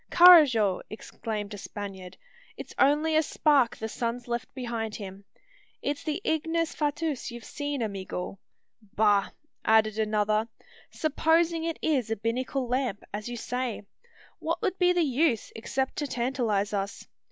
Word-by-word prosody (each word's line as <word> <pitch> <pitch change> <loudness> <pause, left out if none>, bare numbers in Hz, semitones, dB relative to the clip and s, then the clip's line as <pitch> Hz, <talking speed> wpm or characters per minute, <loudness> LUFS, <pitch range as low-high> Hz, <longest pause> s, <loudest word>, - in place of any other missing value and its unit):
"Carrajo!" 290 - +7
exclaimed 215 -1 -5
a 205 - -7
Spaniard; 190 -2 -7 0.4
"it's - - -8
only 300 +3 +3
a 315 - +6
spark 290 -6 +2
the 220 - -4
sun's 235 +2 -3
left 240 0 -3
behind 235 -4 -3
him. 195 -1 -8 0.5
It's 285 0 -3
the 305 +1 -2
ignis 325 +1 0
fatuus 300 -2 -2
you've 235 -1 -9
seen, 290 -4 -3
amigo!" 195 -2 -5 0.6
"Bah!" 205 -2 +3 0.3
added 220 -1 +3
another; 215 0 +1 0.4
"supposing 325 +2 +1
it 330 -1 -2
is 265 -8 +1
a 225 - 0
binnacle 250 +4 -2
lamp, 245 -4 -1
as 210 +3 -4
you 240 - -5
say, 245 -1 -3 0.6
what - - -2
would 380 -3 -1
be 360 -1 +5
the 355 -1 +2
use, 275 -4 +1
except 265 +4 -2
to 295 - -1
tantalise 235 -6 -1
us. 200 0 -3
240 Hz, 140 wpm, -28 LUFS, 215-300 Hz, 0.6 s, Carrajo